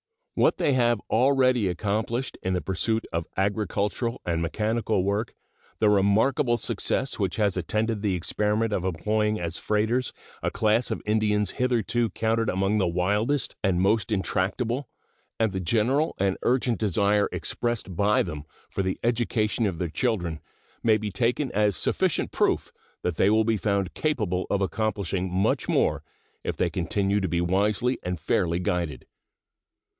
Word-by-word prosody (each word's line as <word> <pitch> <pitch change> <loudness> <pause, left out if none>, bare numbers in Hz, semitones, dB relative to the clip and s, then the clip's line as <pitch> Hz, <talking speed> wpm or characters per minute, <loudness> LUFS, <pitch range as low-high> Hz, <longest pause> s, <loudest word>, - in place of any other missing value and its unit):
What - - +3
they 140 - +2
have 120 -3 +3
already 130 -2 +3
accomplished 110 +7 -2
in 95 - -1
the 90 - 0
pursuit 110 +4 -1
of 85 0 -2
agricultural 105 +3 -1
and 85 -1 0
mechanical 110 +3 0
work, 100 +4 -1 0.4
the 105 -1 +3
remarkable 110 +6 +3
success 135 +2 -1
which 95 -3 0
has 105 -4 +1
attended 105 +4 -1
the 100 -3 +1
experiment 105 +5 0
of 90 - -1
employing 105 +5 0
as 85 0 -4
freighters 110 +4 0 0.3
a - - 0
class 110 +2 +1
of - - -3
Indians 105 -1 +1
hitherto 120 -2 0
counted 115 +1 0
among 95 +3 +1
the 95 - +2
wildest 105 +11 0
and 95 -3 +2
most 100 +3 +2
intractable, 110 +6 -1 0.5
and 110 -2 +2
the 95 - -3
general 120 - +1
and 95 -1 +1
urgent 125 -1 +1
desire 105 0 +2
expressed 120 -6 -2
by 100 +4 +3
them 75 -4 -6 0.3
for - - -1
the 95 -1 -2
education 115 -2 +1
of 90 -4 -3
their 85 0 -2
children 90 - -1 0.4
may 110 -2 +4
be 105 -1 -4
taken 120 +7 0
as 105 -1 +2
sufficient 75 - 0
proof - - +1 0.3
that 90 -2 -1
they 95 - +4
will 110 +1 +4
be 110 0 +1
found 100 -2 -1
capable 105 - -1
of 100 - 0
accomplishing 95 -1 -1
much 95 +2 0
more - - +2 0.4
if - - -3
they - - +1
continue 100 +3 0
to 95 - -1
be 85 0 0
wisely 105 +7 +1
and 90 -1 -3
fairly 85 +1 +1
guided. 85 -6 -2
105 Hz, 155 wpm, -26 LUFS, 95-115 Hz, 0.5 s, may